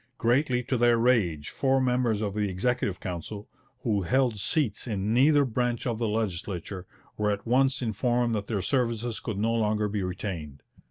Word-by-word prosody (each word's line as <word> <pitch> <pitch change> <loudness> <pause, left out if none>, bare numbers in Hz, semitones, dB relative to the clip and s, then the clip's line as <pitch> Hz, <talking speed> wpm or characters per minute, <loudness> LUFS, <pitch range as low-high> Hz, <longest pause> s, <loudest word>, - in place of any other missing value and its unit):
Greatly 125 +1 +2
to 125 - -1
their 120 0 +4
rage, 100 -11 +2
four 135 -1 +1
members 125 -4 +1
of 105 -2 -2
the 105 -1 -1
Executive 100 0 -1
Council, 95 +4 -6 0.4
who 105 -4 +1
held 125 +3 +1
seats 130 - 0
in 105 -1 -1
neither 145 +3 +5
branch 120 -1 -1
of 115 -3 -1
the 115 - 0
legislature, 95 -3 -3 0.3
were 105 0 +1
at 100 -1 -2
once 130 +2 +2
informed 120 +1 0
that 100 -2 -2
their 100 -5 -2
services 120 -3 0
could 110 -5 -4
no 110 +3 +1
longer 105 -2 +1
be 105 0 -2
retained. 90 -6 -5
110 Hz, 170 wpm, -27 LUFS, 100-125 Hz, 0.4 s, neither